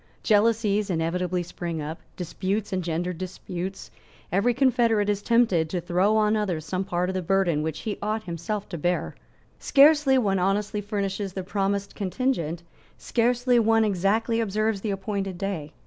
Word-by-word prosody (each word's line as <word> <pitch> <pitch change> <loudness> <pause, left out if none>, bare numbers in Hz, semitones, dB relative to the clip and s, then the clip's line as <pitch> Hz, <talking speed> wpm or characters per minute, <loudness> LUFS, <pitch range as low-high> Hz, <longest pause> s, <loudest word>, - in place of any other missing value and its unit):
Jealousies 215 -1 +2
inevitably 180 +1 -1
spring 170 -1 -5
up. 155 +2 -5 0.2
Disputes 190 +4 -3
engender 175 0 -1
disputes. 185 +1 -6 0.4
Every 200 +6 +3
confederate 235 -5 +2
is 205 -1 0
tempted 205 -9 +2
to 180 - -2
throw 185 +5 +2
on 215 0 +3
others 180 -7 -1
some 185 +3 -2
part 180 -1 -1
of - - -2
the 185 - -1
burden 180 -3 +1
which 155 0 -3
he 210 -2 -4
ought 215 +1 -2
himself 185 +4 -4
to 170 - -5
bear. 175 +3 -1 0.5
Scarcely 285 -1 +5
one 200 -6 +1
honestly 205 +3 0
furnishes 200 -1 -3
the 190 - -4
promised 200 +1 -1
contingent. 185 - -2 0.3
Scarcely 245 +1 +2
one 225 0 +3
exactly 210 +4 +1
observes 215 -1 0
the 215 - -2
appointed 195 -1 -3
day. 175 -6 -4
195 Hz, 150 wpm, -25 LUFS, 180-215 Hz, 0.5 s, Scarcely